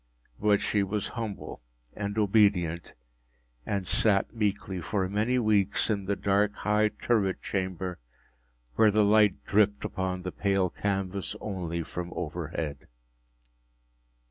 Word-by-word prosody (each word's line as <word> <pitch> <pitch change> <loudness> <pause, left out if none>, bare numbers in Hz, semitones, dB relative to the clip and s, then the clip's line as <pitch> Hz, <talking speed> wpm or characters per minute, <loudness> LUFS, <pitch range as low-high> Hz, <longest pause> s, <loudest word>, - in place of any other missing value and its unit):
But 105 -1 +3
she 105 - +1
was 100 +1 -2
humble 110 - -6 0.3
and 100 0 -4
obedient, 100 -6 +2 0.7
and 100 -2 -1
sat 100 +2 +3
meekly 100 -4 -2
for 95 +2 -1
many 105 +6 0
weeks 105 -2 +2
in 100 -2 -2
the 100 +1 0
dark, 100 +1 +1
high 105 +1 +2
turret 105 -3 0
chamber 95 -2 -3 0.7
where 110 - +5
the 105 0 +3
light 105 -1 +3
dripped 105 -1 +2
upon 90 -1 -3
the 90 - -4
pale 95 -2 0
canvas 95 -1 -2
only 85 -5 -3
from 85 +1 -6
overhead. 80 -3 -4
100 Hz, 120 wpm, -28 LUFS, 90-105 Hz, 0.7 s, where